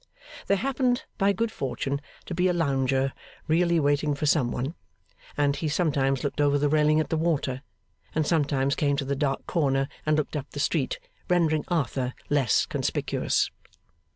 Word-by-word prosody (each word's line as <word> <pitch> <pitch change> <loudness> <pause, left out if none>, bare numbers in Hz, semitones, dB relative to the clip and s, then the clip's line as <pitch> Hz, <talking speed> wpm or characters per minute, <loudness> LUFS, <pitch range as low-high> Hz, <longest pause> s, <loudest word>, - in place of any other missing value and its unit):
There 200 - +3
happened, 255 0 0 0.2
by 200 0 +4
good 220 +3 -1
fortune, 140 - -3 0.2
to - - -5
be 180 +2 +2
a 180 - +2
lounger 135 -4 +1 0.3
really 170 +1 +3
waiting 145 0 +1
for 145 - -2
some 140 -5 +3
one; 130 +6 -3 0.6
and 145 -1 +2
he 155 - -2
sometimes 140 -5 +1
looked 145 +1 -1
over 145 0 +3
the 145 0 +1
railing 155 0 +4
at 155 - -1
the 160 - 0
water, 145 -5 0 0.5
and 155 -1 +2
sometimes 140 -4 +1
came 145 -1 +1
to 140 -1 -2
the 140 +1 -1
dark 135 -1 -1
corner 135 -5 +1 0.2
and 155 0 +2
looked 155 0 -2
up 145 - -4
the - - -5
street, - - 0 0.3
rendering 160 -4 +2
Arthur 130 -6 -1 0.2
less 135 -7 +3
conspicuous. - - 0
145 Hz, 170 wpm, -26 LUFS, 135-165 Hz, 0.6 s, by